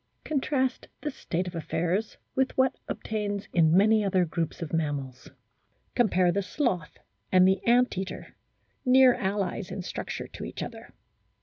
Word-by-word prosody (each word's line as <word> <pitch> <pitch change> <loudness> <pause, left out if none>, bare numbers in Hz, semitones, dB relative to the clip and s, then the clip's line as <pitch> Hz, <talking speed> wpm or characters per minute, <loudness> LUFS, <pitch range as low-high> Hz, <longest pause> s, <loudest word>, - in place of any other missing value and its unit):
Contrast 265 -3 -1
this 295 -2 -3
state 180 -6 -3
of 180 - -6
affairs 175 +5 -1 0.2
with 265 0 0
what 260 0 +3
obtains 205 -2 -3
in 165 0 +5
many 215 +2 +5
other 190 -2 +2
groups 165 0 -3
of 160 - -7
mammals. 145 -5 -2 0.6
Compare 185 -7 +3
the 200 - 0
sloth 190 - -2 0.3
and 185 0 +6
the 190 +1 +2
ant 245 +1 +4
eater, 190 -1 -6 0.5
near 255 -1 +7
allies 195 -1 -2
in 190 - -5
structure - - -5
to - - -9
each - - -5
other. - - -9
195 Hz, 145 wpm, -28 LUFS, 175-245 Hz, 0.6 s, near